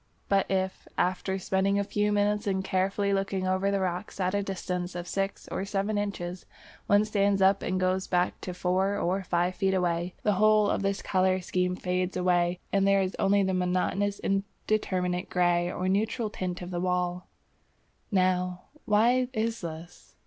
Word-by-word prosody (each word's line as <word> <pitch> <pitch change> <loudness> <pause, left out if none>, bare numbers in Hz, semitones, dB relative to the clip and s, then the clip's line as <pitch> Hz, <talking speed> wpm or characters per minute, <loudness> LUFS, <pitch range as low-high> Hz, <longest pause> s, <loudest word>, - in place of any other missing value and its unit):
But 195 -1 +2
if, 190 0 -2
after 185 +1 0
spending 190 +1 +1
a 200 - +2
few 210 +1 0
minutes 205 0 +1
in 190 -1 0
carefully 195 +2 0
looking 195 -1 -1
over 185 +1 +1
the 200 0 +1
rocks 185 +2 -3
at 185 0 0
a 205 - +1
distance 180 -2 -4
of 175 0 -5
six 195 +2 -3
or - - -3
seven 200 +1 -1
inches, 190 -3 -4 0.4
one 205 +1 +4
stands 200 -2 +1
up 195 +1 +4
and 185 0 -1
goes 185 +1 0
back 180 0 0
to 180 - -5
four 185 +3 +1
or 185 +2 0
five 175 -1 0
feet 190 0 +1
away, 175 -1 -1
the 210 - +3
whole 215 -1 +5
of - - 0
this 195 0 -1
colour 185 0 +2
scheme 180 0 -1
fades 180 0 -2
away 175 -1 +2
and 195 0 +3
there 195 0 +4
is 185 - -3
only 200 +1 +3
the 190 0 0
monotonous 185 +3 0
indeterminate 195 -2 -1
grey 175 -1 +2
or 185 +1 -2
neutral 215 +3 0
tint 180 -2 -4
of 175 - -7
the 175 -1 -2
wall. 180 0 -1 0.8
Now 180 -1 +1 0.2
why 240 +4 +3
is 225 0 -1
this? 165 0 -9
190 Hz, 175 wpm, -28 LUFS, 180-200 Hz, 0.8 s, whole